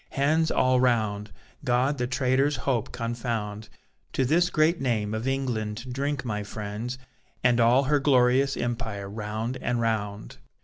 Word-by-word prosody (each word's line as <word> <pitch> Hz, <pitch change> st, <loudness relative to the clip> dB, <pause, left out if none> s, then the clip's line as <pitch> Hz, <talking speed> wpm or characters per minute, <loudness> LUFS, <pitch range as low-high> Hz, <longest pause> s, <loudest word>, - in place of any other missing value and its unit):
Hands 155 Hz, +4 st, +2 dB
all 130 Hz, 0 st, +3 dB
round! 110 Hz, -5 st, +1 dB, 0.3 s
God 130 Hz, +2 st, +1 dB
the 125 Hz, -, 0 dB
traitor's 130 Hz, +3 st, +1 dB
hope 130 Hz, -3 st, -1 dB
confound! 115 Hz, -3 st, -4 dB, 0.4 s
To 130 Hz, -, +1 dB
this 170 Hz, +6 st, +3 dB
great 160 Hz, +1 st, +2 dB
name 110 Hz, -5 st, 0 dB
of 110 Hz, +3 st, -3 dB
England 125 Hz, -3 st, -2 dB
drink, 140 Hz, 0 st, -2 dB
my 105 Hz, -3 st, -2 dB
friends, 105 Hz, +4 st, -5 dB, 0.5 s
And 120 Hz, -1 st, +4 dB
all 120 Hz, +4 st, +5 dB
her 145 Hz, +2 st, +2 dB
glorious 135 Hz, 0 st, +3 dB
empire, 115 Hz, -4 st, -3 dB
round 110 Hz, +4 st, -4 dB
and 120 Hz, -1 st, -1 dB
round. 105 Hz, -3 st, -2 dB
125 Hz, 140 wpm, -26 LUFS, 110-135 Hz, 0.5 s, all